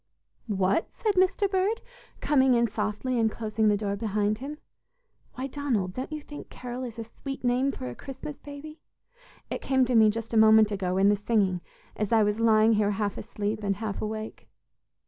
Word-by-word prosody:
"What!" 195 -1 +1
said 430 -3 0
Mr. 380 +2 +3
Bird, 390 +4 0 0.4
coming 265 -3 +4
in 235 0 +3
softly 215 +4 -2
and 225 -1 +3
closing 220 0 -1
the 210 -1 +3
door 200 -1 -2
behind 210 0 -1
him. 285 +3 -6 0.8
"Why, 260 - -4
Donald, 250 -10 -1
don't 255 +7 -5
you 305 -1 -4
think 295 0 -10
'Carol' 250 +1 -6
is 235 -2 -8
a 230 - -4
sweet 270 +5 -8
name 250 +3 +2
for 130 - -6
a 125 - -5
Christmas 270 - -8
baby? 295 +2 -10 0.7
It - - -3
came 265 -1 +2
to 250 - -1
me 220 -2 +6
just 225 +2 -4
a - - +3
moment 220 -1 +6
ago 190 -2 -1
in 195 +1 +5
the 205 - +4
singing 200 -4 +1 0.3
as 210 -2 -2
I 225 -2 +5
was 210 +1 0
lying 225 0 +5
here 210 -1 +2
half 205 0 -1
asleep 215 0 -4
and 200 -1 0
half 210 -1 -4
awake." 215 0 -5
220 Hz, 190 wpm, -27 LUFS, 210-265 Hz, 0.8 s, me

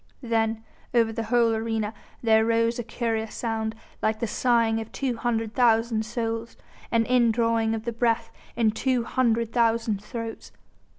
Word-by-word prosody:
Then 225 -1 0 0.3
over 225 -1 +3
the 225 0 -3
whole 230 0 +3
arena 220 -1 -2 0.3
there 220 -1 +5
rose 230 +1 +1
a - - -2
curious 225 -1 -2
sound, 225 -1 -2 0.3
like 215 0 0
the 235 - 0
sighing 230 -1 +2
of 220 - -9
two 260 -3 -2
hundred 225 -1 -1
thousand 225 -2 +2
souls, 230 0 -3 0.3
an 230 -1 +3
indrawing 230 -2 +2
of 220 0 -6
the 235 - -2
breath 230 0 0 0.2
in 225 -2 +3
two 250 +2 0
hundred 230 -2 0
thousand 230 -3 +1
throats. 230 +1 -6
230 Hz, 155 wpm, -26 LUFS, 225-235 Hz, 0.3 s, there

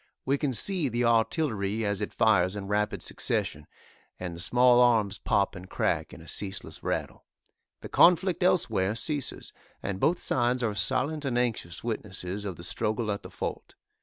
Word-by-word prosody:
We 140 +1 +1
can 145 -3 0
see 160 - +3
the 120 +1 0
artillery 115 -3 +1
as 100 -1 -1
it 105 - -3
fires 100 -3 +3
in 100 -1 -5
rapid 105 +1 -1
succession, - - -1 0.5
and 90 -2 -5
the - - -9
small 125 +7 +4
arms 110 -5 +3
pop 100 0 +1
and 95 0 -10
crack - - -1
in - - -11
a - - -14
ceaseless 100 -1 -5
rattle. - - -3 0.6
The - - -8
conflict 180 +2 +4
elsewhere 110 - +2
ceases, 140 +5 -3 0.3
and 95 -1 -3
both 170 - +2
sides 125 -3 +1
are 110 -2 0
silent 130 - 0
and 130 -3 -1
anxious 110 -8 -2
witnesses 105 -3 -4
of 95 -3 -4
the 85 - -11
struggle 105 +5 -1
at 100 - -3
the - - -10
fort. - - -6
110 Hz, 170 wpm, -28 LUFS, 100-125 Hz, 0.6 s, small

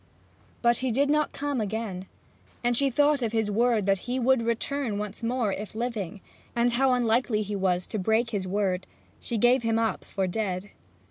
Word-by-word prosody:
But 235 0 +4
he 260 - -1
did 280 +5 +2
not 300 0 +2
come 285 -4 -2
again, 205 -3 -4 0.6
and 240 - +3
when - - +2
she 275 +3 +2
thought 290 +2 +3
of 230 -2 -1
his 220 -2 +1
word 230 -1 +2
that 195 -1 +2
he 250 - 0
would 260 0 +3
return 235 0 -1
once 210 -1 -5
more, 230 -3 0
if 210 +2 -6
living, 220 -5 -3 0.3
and 240 +1 +3
how 260 +1 +3
unlikely 235 -2 +2
he 205 0 -4
was 185 -2 +1
to 215 - -4
break 220 +4 +1
his 195 -4 -2
word, 190 -1 -1 0.3
she 235 - -3
gave 245 +4 +4
him 225 -1 +1
up 225 -1 0
for 195 -2 -2
dead. 190 0 -3
225 Hz, 195 wpm, -27 LUFS, 205-245 Hz, 0.6 s, But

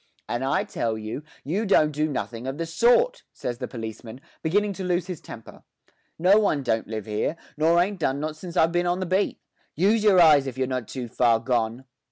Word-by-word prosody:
'And 120 +2 -2
I 135 - +1
tell 115 -1 -2
you 110 +5 -5 0.2
you 185 +10 -1
don't 155 -7 +3
do 150 +1 -1
nothing 125 -3 -4
of 135 +1 -4
the 165 - -2
sort,' 245 - +3
says 120 -1 -5
the 125 - -4
policeman, 115 +1 -8 0.2
beginning 205 +5 +1
to 190 - -6
lose 180 -1 0
his 180 -4 -6
temper. 115 - -11 0.6
'No 185 +5 +5
one 155 -9 +1
don't 110 -3 0
live 110 -2 -5
'ere, 110 +9 -1 0.2
nor 165 +3 +3
ain't 190 +2 0
done 140 -3 0
not 155 +1 -3
since 170 +2 -8
I've 165 +1 +4
bin 175 0 +1
on 175 +1 0
the 185 - -2
beat. 190 +3 0 0.4
Use 205 +6 +2
your 200 -4 +5
eyes 150 -5 +6
if 130 - -6
you're 130 - +1
not 130 -3 -3
too 125 -3 -5
far 115 0 +2
gone.' 120 +1 -1
150 Hz, 215 wpm, -25 LUFS, 120-180 Hz, 0.6 s, eyes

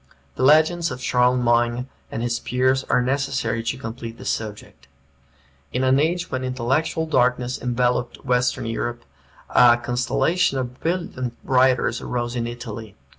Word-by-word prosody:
The - - -6
legends 160 +5 +4
of 125 - -6
Charlemagne 125 0 +2 0.2
and 115 - -3
his 120 -1 -1
peers 130 +1 +1
are 125 - +2
necessary 130 -3 -1
to 115 +3 -3
complete 115 -1 -7
the - - -11
subject. 105 -10 -5 0.8
In 125 - -1
an 130 +1 +4
age 170 +4 0
when 130 0 -2
intellectual 130 +6 0
darkness 125 -4 +1
enveloped 125 0 -1
Western 125 -2 +1
Europe, 120 +1 -3 0.5
a 120 -1 +6
constellation 130 +7 0
of 125 -1 -4
brilliant 160 -8 -3
writers 125 -2 +2
arose 120 0 -3
in 115 -1 -1
Italy. 115 -3 -7
125 Hz, 135 wpm, -22 LUFS, 120-130 Hz, 0.8 s, a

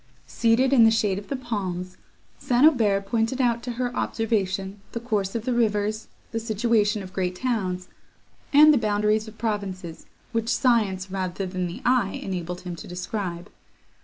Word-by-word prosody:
Seated 240 +4 +2
in 240 -4 +7
the 225 - +7
shade 210 -3 +1
of 205 - -12
the 275 - -2
palms, 185 -7 -4 0.4
St. 250 +3 +3
Aubert 210 -10 +3
pointed 225 +5 0
out 235 -2 +2
to 245 0 -4
her 245 0 -3
observation 200 -3 -1
the 235 - -2
course 210 -4 -2
of 230 -1 -3
the 255 - 0
rivers, 215 -2 0 0.2
the 225 - -2
situation 220 -2 +1
of 185 -1 -11
great 185 -2 -1
towns, 185 -6 -2 0.6
and 300 +1 +8
the 280 - +3
boundaries 210 0 +1
of 220 0 -11
provinces, 195 -6 -4 0.2
which 230 -1 -1
science, 205 -8 +1
rather 190 0 -3
than 185 -1 -3
the 170 - -8
eye, 245 -6 +2
enabled 180 -2 -4
him 180 -1 -6
to - - -9
describe. 180 0 -5
210 Hz, 165 wpm, -25 LUFS, 190-235 Hz, 0.6 s, and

